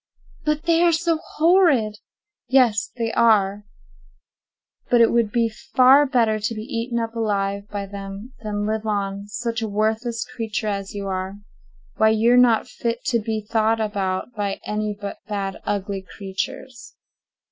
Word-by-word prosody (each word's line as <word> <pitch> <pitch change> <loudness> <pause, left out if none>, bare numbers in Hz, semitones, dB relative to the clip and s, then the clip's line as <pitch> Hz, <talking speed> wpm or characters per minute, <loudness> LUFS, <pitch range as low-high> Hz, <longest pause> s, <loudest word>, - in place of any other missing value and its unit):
"But 300 0 0
they 335 0 +3
are 345 -1 +5
so 330 0 +1
horrid!" 305 - +3 0.5
"Yes, 240 -5 +3
they 230 -1 -1
are; 205 -3 +3 1.2
but 240 - +4
it 230 - +5
would 230 -3 +2
be 230 0 +2
far 260 +5 +4
better 230 -5 +2
to 215 +2 -2
be 215 - -5
eaten 235 -1 -3
up 230 0 -3
alive 200 -2 -1
by 200 -1 -4
them 200 +4 -8
than 205 -1 -3
live 220 +1 -2
on—such 205 +3 -2
a 220 - -2
worthless 220 +3 -1
creature 220 -1 -3
as 200 0 -4
you 200 -1 -4
are. 190 0 -3 0.6
Why, 220 - +5
you're 225 +3 +4
not 245 -3 +4
fit 235 0 -4
to 235 - +2
be 215 -1 -3
thought 225 0 +2
about 200 0 -2
by 205 -3 -3
any 210 -1 -2
but 200 -1 -6
bad 200 -2 -3
ugly 200 -1 -2 0.2
creatures." 200 +6 -6
220 Hz, 150 wpm, -22 LUFS, 205-235 Hz, 1.2 s, are